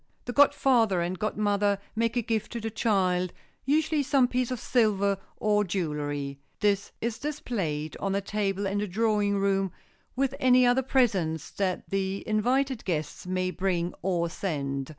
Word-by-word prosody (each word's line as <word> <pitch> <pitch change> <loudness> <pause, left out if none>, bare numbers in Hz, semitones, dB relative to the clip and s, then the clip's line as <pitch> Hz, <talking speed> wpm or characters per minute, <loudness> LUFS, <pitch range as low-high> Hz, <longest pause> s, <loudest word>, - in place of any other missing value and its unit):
The 245 - -4
godfather 245 -8 +4
and 175 +1 -2
godmother 205 -1 +1 0.2
make 230 +2 0
a 240 - +1
gift 220 -1 -2
to 235 - -3
the 225 0 -4
child—usually 215 - 0
some 270 -2 +3
piece 250 0 -1
of 255 -2 -3
silver 200 -5 +2 0.2
or 210 -1 +2
jewelry. 145 -6 -3 0.2
This 200 -1 +1
is 230 0 -2
displayed 190 - -3
on 195 0 -1
a - - +2
table 200 -1 -1
in 195 +1 -1
the 210 - -1
drawing 205 0 +1
room 195 -1 +1 0.4
with 270 +1 0
any 255 -2 +5
other 245 +2 +4
presents 200 - +1
that 190 -2 -2
the 195 0 -2
invited 250 +4 +1
guests 155 -1 -3
may 185 0 0
bring 180 -2 -1
or 175 -2 0
send. 140 -7 -3
200 Hz, 150 wpm, -27 LUFS, 185-235 Hz, 0.4 s, any